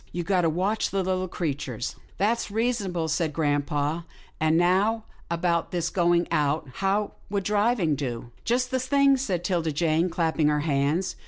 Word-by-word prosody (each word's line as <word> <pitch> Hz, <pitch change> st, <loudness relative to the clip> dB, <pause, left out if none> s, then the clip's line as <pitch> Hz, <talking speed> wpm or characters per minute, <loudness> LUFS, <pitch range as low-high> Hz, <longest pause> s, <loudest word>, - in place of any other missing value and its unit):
You've 175 Hz, -1 st, -3 dB
got 185 Hz, -1 st, +2 dB
to 165 Hz, -, +2 dB
watch 190 Hz, +7 st, 0 dB
the 195 Hz, -1 st, 0 dB
Httle 185 Hz, 0 st, -1 dB
creatures." 140 Hz, -8 st, -3 dB
" -, -, -28 dB
That's 220 Hz, +4 st, +1 dB
reasonable," 205 Hz, -7 st, -1 dB
said 160 Hz, 0 st, 0 dB
grampa, 145 Hz, +1 st, 0 dB, 0.2 s
" -, -, -28 dB
and 155 Hz, +1 st, +3 dB
now 195 Hz, +6 st, +2 dB, 0.3 s
about 170 Hz, 0 st, 0 dB
his 170 Hz, -2 st, -1 dB
going 175 Hz, -1 st, +2 dB
out. 150 Hz, -1 st, +1 dB
How 200 Hz, +1 st, 0 dB, 0.2 s
would 200 Hz, -1 st, -1 dB
driving 210 Hz, -4 st, +2 dB
do?" 120 Hz, -4 st, -4 dB
" -, -, -30 dB
Just 250 Hz, +2 st, 0 dB
the 260 Hz, -, +1 dB
thing," 275 Hz, +2 st, +4 dB
said 195 Hz, -10 st, -2 dB
'Tilda 170 Hz, -3 st, 0 dB
Jane, 165 Hz, +3 st, +1 dB
clapping 165 Hz, -3 st, +1 dB
her 150 Hz, 0 st, +2 dB
hands. 150 Hz, +4 st, 0 dB
175 Hz, 175 wpm, -26 LUFS, 155-200 Hz, 0.3 s, thing